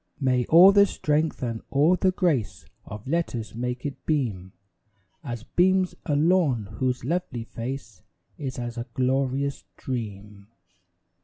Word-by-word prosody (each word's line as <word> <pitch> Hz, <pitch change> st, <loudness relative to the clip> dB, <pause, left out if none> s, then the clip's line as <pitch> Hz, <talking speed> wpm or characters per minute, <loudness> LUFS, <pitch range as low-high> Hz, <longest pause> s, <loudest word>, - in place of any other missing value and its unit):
May 130 Hz, -3 st, +1 dB
all 175 Hz, +4 st, +8 dB
the 200 Hz, 0 st, +6 dB
strength 150 Hz, -3 st, -1 dB
and 115 Hz, -2 st, -3 dB
all 150 Hz, +6 st, +4 dB
the 185 Hz, -, +2 dB
grace 160 Hz, -, -1 dB, 0.2 s
Of 105 Hz, +4 st, -9 dB
Letters 135 Hz, -8 st, -2 dB
make 125 Hz, +2 st, -4 dB
it 145 Hz, -, -5 dB
beam 110 Hz, -, -1 dB, 0.7 s
As 120 Hz, -5 st, -5 dB
beams 185 Hz, +5 st, +2 dB
a 145 Hz, -, +1 dB
lawn 150 Hz, -, +2 dB
whose 125 Hz, -2 st, -1 dB
lovely 155 Hz, -7 st, -2 dB
face 115 Hz, -, -7 dB, 0.3 s
Is 135 Hz, -4 st, -5 dB
as 120 Hz, -1 st, -5 dB
a 120 Hz, -, -5 dB
glorious 135 Hz, +2 st, 0 dB
dream. 105 Hz, -5 st, -6 dB
130 Hz, 135 wpm, -25 LUFS, 120-155 Hz, 0.7 s, all